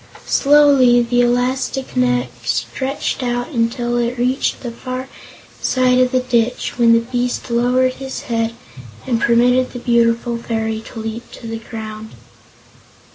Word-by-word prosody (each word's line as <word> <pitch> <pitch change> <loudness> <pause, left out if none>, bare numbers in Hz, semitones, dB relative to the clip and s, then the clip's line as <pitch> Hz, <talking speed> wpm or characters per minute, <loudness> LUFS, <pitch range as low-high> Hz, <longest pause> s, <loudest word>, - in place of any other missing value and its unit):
Slowly 275 -4 +5
the 245 +1 +1
elastic 250 +2 0
neck 125 0 +1
stretched 120 - -2
out 245 -1 -2
until 240 -2 -1
it 240 +1 -1
reached 250 +3 0
the 240 - -5
far 255 +2 -6 0.5
side 255 -1 +2
of 255 0 +3
the 255 - +2
ditch, 245 -1 -1
when 230 -1 +6
the 230 - +4
beast 245 +1 -3
lowered 250 +2 +2
his 265 0 -6
head 230 -1 -2 0.5
and 235 -3 0
permitted 245 +2 +3
the - - -5
beautiful 235 0 +1
fairy 220 -1 -3
to 230 - -9
leap 225 +2 -6
to - - -11
the 225 0 -5
ground. 220 -1 -8
240 Hz, 140 wpm, -18 LUFS, 230-255 Hz, 0.5 s, when